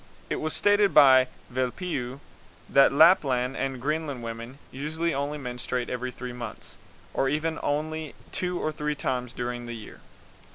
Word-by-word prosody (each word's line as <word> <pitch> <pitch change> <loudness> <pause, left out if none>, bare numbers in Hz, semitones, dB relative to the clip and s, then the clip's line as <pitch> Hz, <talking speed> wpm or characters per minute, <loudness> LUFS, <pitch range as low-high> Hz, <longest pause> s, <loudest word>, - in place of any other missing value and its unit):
It - - +1
was 155 0 -1
stated 205 -1 +3
by 130 -3 +8 0.2
Velpeau 130 0 -3 0.5
that 140 0 +6
Lapland 135 -5 +5
and 135 -1 -2
Greenland 145 -2 -2
women 115 +3 -6
usually 160 +5 -2
only 140 +2 -2
menstruate 125 -2 -3
every 125 0 -2
three 125 0 -7
months, 120 -3 -8 0.3
or 135 - +1
even 160 +3 -1
only 155 +1 -2 0.2
two 180 -1 -2
or 155 - -1
three 150 0 -2
times 125 -3 -2
during 120 -1 -4
the 120 - -5
year. 110 -2 -10
135 Hz, 150 wpm, -27 LUFS, 125-155 Hz, 0.5 s, by